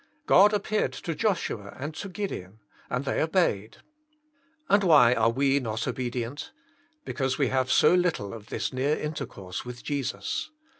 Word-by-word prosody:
God 205 Hz, +2 st, +6 dB
appeared 210 Hz, 0 st, 0 dB
to 170 Hz, -, -4 dB
Joshua 155 Hz, -, -2 dB
and 145 Hz, +4 st, -4 dB
to 195 Hz, +5 st, -6 dB
Gid 200 Hz, +1 st, -4 dB
eon, 95 Hz, +3 st, -8 dB, 0.3 s
and 125 Hz, +2 st, -2 dB
they -, -, 0 dB
obeyed. 160 Hz, -, 0 dB, 0.9 s
And 200 Hz, 0 st, +4 dB
why 145 Hz, -9 st, +6 dB
are 115 Hz, -2 st, +3 dB
we 135 Hz, +3 st, +2 dB
not 115 Hz, -2 st, -3 dB
obedient? 125 Hz, +1 st, -4 dB, 0.5 s
Because 135 Hz, -2 st, -1 dB
we 140 Hz, -4 st, +2 dB
have 130 Hz, -1 st, 0 dB
so -, -, +5 dB
little 175 Hz, -, +1 dB
of 110 Hz, -2 st, -10 dB
this 110 Hz, +1 st, -3 dB
near 140 Hz, +4 st, +1 dB
intercourse 100 Hz, -, -5 dB
with 125 Hz, 0 st, -9 dB
Jesus. 145 Hz, -, -3 dB
135 Hz, 155 wpm, -27 LUFS, 115-165 Hz, 0.9 s, God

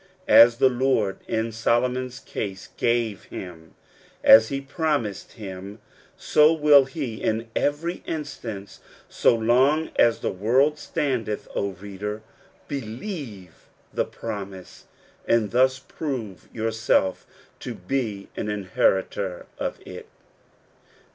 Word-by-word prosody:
As 115 Hz, 0 st, +8 dB
the 130 Hz, -, +5 dB
Lord 125 Hz, -6 st, +1 dB
in 115 Hz, 0 st, -1 dB
Solomon's 125 Hz, +3 st, 0 dB
case 95 Hz, -7 st, -6 dB
gave 115 Hz, -3 st, 0 dB
him 80 Hz, -3 st, -9 dB, 0.5 s
''as 110 Hz, 0 st, +8 dB
he 135 Hz, -, -3 dB
promised 140 Hz, -, -2 dB
him^' 100 Hz, -1 st, -8 dB, 0.4 s
so 150 Hz, +1 st, +4 dB
will 150 Hz, -3 st, +6 dB
he 135 Hz, -5 st, -5 dB
in 110 Hz, +1 st, -1 dB
every 160 Hz, +5 st, -1 dB
instance 120 Hz, -10 st, -6 dB, 0.3 s
so -, -, +3 dB
long 130 Hz, +8 st, +2 dB
as 115 Hz, -1 st, +4 dB
the -, -, -1 dB
world 130 Hz, +10 st, +2 dB
standeth. 120 Hz, -7 st, -2 dB
O 100 Hz, -1 st, -2 dB
reader! 105 Hz, +3 st, -6 dB, 0.4 s
believe 115 Hz, -, -7 dB, 0.3 s
the -, -, +1 dB
promise, 100 Hz, -4 st, -8 dB, 0.4 s
and 115 Hz, -3 st, +2 dB
thus 130 Hz, +2 st, +3 dB
prove 130 Hz, -, -6 dB
yourself 110 Hz, -4 st, 0 dB, 0.3 s
to -, -, -6 dB
be 105 Hz, -1 st, -3 dB
an 105 Hz, -, -3 dB
inheritor 95 Hz, -2 st, 0 dB
of -, -, -3 dB
it. -, -, -9 dB
115 Hz, 110 wpm, -24 LUFS, 100-135 Hz, 0.5 s, As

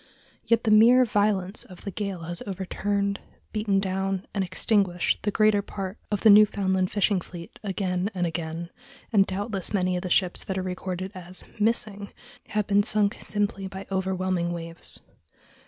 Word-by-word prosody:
Yet 230 Hz, 0 st, +2 dB
the 220 Hz, -, +2 dB
mere 240 Hz, +4 st, +7 dB
violence 205 Hz, -3 st, +1 dB
of 185 Hz, -, -14 dB
the 200 Hz, -, -4 dB
gale 195 Hz, -2 st, -4 dB
has 175 Hz, +1 st, 0 dB
overturned, 200 Hz, +1 st, -2 dB, 0.3 s
beaten 210 Hz, -2 st, +1 dB
down, 190 Hz, 0 st, -2 dB
and 195 Hz, -, 0 dB
extinguished 185 Hz, -1 st, +1 dB
the 205 Hz, -, 0 dB
greater 215 Hz, 0 st, +3 dB
part 195 Hz, 0 st, -6 dB
of 205 Hz, -, -1 dB
the 220 Hz, -, +7 dB
Newfoundland 195 Hz, -3 st, +4 dB
fishing 200 Hz, -2 st, +1 dB
fleet 170 Hz, -1 st, -11 dB
again 190 Hz, -1 st, -1 dB
and 180 Hz, -1 st, 0 dB
again, 165 Hz, 0 st, -4 dB, 0.4 s
and 195 Hz, -2 st, +5 dB
doubtless 195 Hz, 0 st, -2 dB
many 185 Hz, -1 st, +1 dB
of 180 Hz, -, -2 dB
the 185 Hz, -, -4 dB
ships 180 Hz, 0 st, +2 dB
that 190 Hz, -, -3 dB
are 185 Hz, -, -1 dB
recorded 185 Hz, 0 st, -4 dB
as 180 Hz, -1 st, -6 dB, 0.2 s
"missing" 210 Hz, -2 st, 0 dB, 0.4 s
have 210 Hz, -1 st, -1 dB
been 200 Hz, 0 st, +4 dB
sunk 205 Hz, -1 st, +2 dB
simply 205 Hz, -2 st, -1 dB
by 190 Hz, 0 st, -8 dB
overwhelming 185 Hz, -2 st, -1 dB
waves. 165 Hz, 0 st, -5 dB
195 Hz, 160 wpm, -26 LUFS, 185-205 Hz, 0.4 s, mere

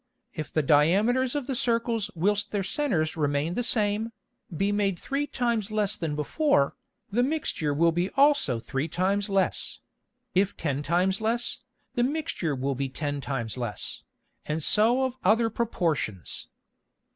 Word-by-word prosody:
If 155 Hz, -, -5 dB
the 155 Hz, -, +1 dB
Diameters 205 Hz, -, +3 dB
of 290 Hz, -3 st, -1 dB
the 270 Hz, -, -2 dB
Circles 230 Hz, -3 st, 0 dB
whilst 205 Hz, +4 st, +1 dB
their 205 Hz, -2 st, 0 dB
Centers 180 Hz, -, 0 dB
remain 145 Hz, +1 st, 0 dB
the 245 Hz, -, -1 dB
same, 220 Hz, -1 st, +1 dB, 0.4 s
be 195 Hz, +5 st, 0 dB
made 200 Hz, -3 st, +1 dB
three 280 Hz, +9 st, -2 dB
times 235 Hz, -6 st, -1 dB
less 210 Hz, -1 st, 0 dB
than 160 Hz, -6 st, -3 dB
before, 150 Hz, -, +2 dB, 0.4 s
the 235 Hz, +5 st, +2 dB
Mixture 260 Hz, -, 0 dB
will 165 Hz, +4 st, +3 dB
be 175 Hz, +3 st, 0 dB
also 280 Hz, -, +4 dB
three 135 Hz, +6 st, -2 dB
times 195 Hz, +4 st, 0 dB
less; 195 Hz, -1 st, 0 dB, 0.6 s
if 195 Hz, +2 st, +1 dB
ten 145 Hz, -3 st, -1 dB
times 180 Hz, +6 st, +1 dB
less, 235 Hz, +2 st, 0 dB, 0.3 s
the 240 Hz, -, +1 dB
Mixture 255 Hz, -, -1 dB
will 135 Hz, +1 st, -1 dB
be 135 Hz, +1 st, -2 dB
ten 145 Hz, +1 st, -3 dB
times 125 Hz, -4 st, -3 dB
less, 120 Hz, -4 st, -4 dB, 0.5 s
and 155 Hz, +1 st, -1 dB
so 235 Hz, -, +4 dB
of 260 Hz, -1 st, -2 dB
other 225 Hz, +4 st, +3 dB
Proportions. 165 Hz, -, -2 dB
195 Hz, 150 wpm, -27 LUFS, 150-235 Hz, 0.6 s, also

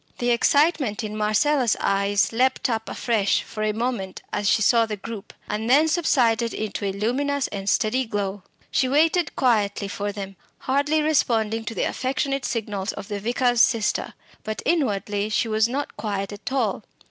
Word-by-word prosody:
The 245 Hz, 0 st, +1 dB
excitement 275 Hz, -2 st, +2 dB
in 215 Hz, 0 st, -5 dB
Marcella's 230 Hz, +4 st, +2 dB
eyes 200 Hz, +1 st, +1 dB
leapt 255 Hz, +1 st, +1 dB
up 225 Hz, -1 st, -3 dB
afresh 215 Hz, -5 st, +1 dB
for 215 Hz, -, -7 dB
a 215 Hz, 0 st, +1 dB
moment 220 Hz, -4 st, -3 dB
as 205 Hz, -, +1 dB
she 215 Hz, -, +3 dB
saw 230 Hz, +1 st, +4 dB
the 210 Hz, -1 st, -4 dB
group, 215 Hz, 0 st, -8 dB, 0.2 s
and 215 Hz, +2 st, -3 dB
then 295 Hz, +5 st, +5 dB
subsided 245 Hz, -9 st, +2 dB
into 210 Hz, -1 st, -3 dB
a 195 Hz, -, 0 dB
luminous 265 Hz, +8 st, -1 dB
and 200 Hz, -1 st, -3 dB
steady 255 Hz, +4 st, +1 dB
glow. 205 Hz, -2 st, -3 dB, 0.3 s
She 260 Hz, -, +2 dB
waited 320 Hz, +3 st, +2 dB
quietly 210 Hz, -6 st, +1 dB
for 205 Hz, +1 st, -3 dB
them, 195 Hz, -2 st, -7 dB, 0.2 s
hardly 290 Hz, +3 st, +1 dB
responding 225 Hz, -7 st, +1 dB
to 225 Hz, -, -5 dB
the -, -, 0 dB
affectionate 275 Hz, +1 st, -1 dB
signals 210 Hz, -4 st, -3 dB
of 200 Hz, -1 st, -8 dB
the 205 Hz, -1 st, -3 dB
vicar's 245 Hz, +2 st, +2 dB
sister; 225 Hz, -4 st, +1 dB, 0.3 s
but 215 Hz, 0 st, -5 dB
inwardly 210 Hz, -, 0 dB
she 225 Hz, +1 st, +1 dB
was 220 Hz, +1 st, +2 dB
not 280 Hz, +3 st, -3 dB
quiet 200 Hz, -2 st, -3 dB
at 205 Hz, +5 st, -7 dB
all. 225 Hz, -6 st, 0 dB
225 Hz, 170 wpm, -24 LUFS, 205-260 Hz, 0.3 s, then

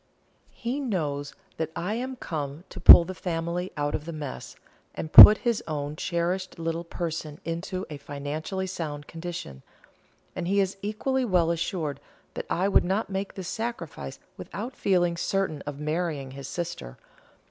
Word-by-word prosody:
He 245 Hz, +4 st, -4 dB
knows 150 Hz, -, -3 dB, 0.2 s
that 160 Hz, -1 st, -2 dB
I 185 Hz, +5 st, -2 dB
am 255 Hz, +3 st, -3 dB
come 150 Hz, -, -5 dB
to -, -, -9 dB
pull 170 Hz, -, +10 dB
the 185 Hz, -, -5 dB
family 170 Hz, +1 st, -3 dB
out 145 Hz, 0 st, -1 dB
of 150 Hz, -, -3 dB
the 170 Hz, -, -5 dB
mess, 150 Hz, -, -7 dB, 0.4 s
and 155 Hz, -, -6 dB
put 210 Hz, -, +13 dB
his 235 Hz, -2 st, +1 dB
own 150 Hz, -1 st, -3 dB
cherished 180 Hz, +3 st, -2 dB
little 165 Hz, 0 st, -3 dB
person 165 Hz, -3 st, -5 dB
into 175 Hz, +3 st, -4 dB
a 150 Hz, -, -7 dB
financially 145 Hz, +6 st, -4 dB
sound 155 Hz, -6 st, -5 dB
condition; 165 Hz, -, -7 dB, 0.7 s
and 175 Hz, -1 st, -3 dB
he 200 Hz, +2 st, +2 dB
is 195 Hz, 0 st, 0 dB
equally 255 Hz, +6 st, -1 dB
well 180 Hz, -7 st, +2 dB
assured 165 Hz, -3 st, -2 dB, 0.3 s
that -, -, -6 dB
I 185 Hz, +3 st, +1 dB
would 200 Hz, -, +4 dB
not 195 Hz, +3 st, -1 dB
make 195 Hz, +1 st, -3 dB
this 190 Hz, -3 st, -6 dB
sacrifice 175 Hz, -, -5 dB, 0.2 s
without 215 Hz, -, -6 dB
feeling 175 Hz, -3 st, +1 dB
certain 185 Hz, -5 st, -1 dB
of 145 Hz, -1 st, -5 dB
marrying 155 Hz, -3 st, -2 dB
his 135 Hz, 0 st, -8 dB
sister. 165 Hz, -, -5 dB
170 Hz, 160 wpm, -26 LUFS, 150-190 Hz, 0.7 s, put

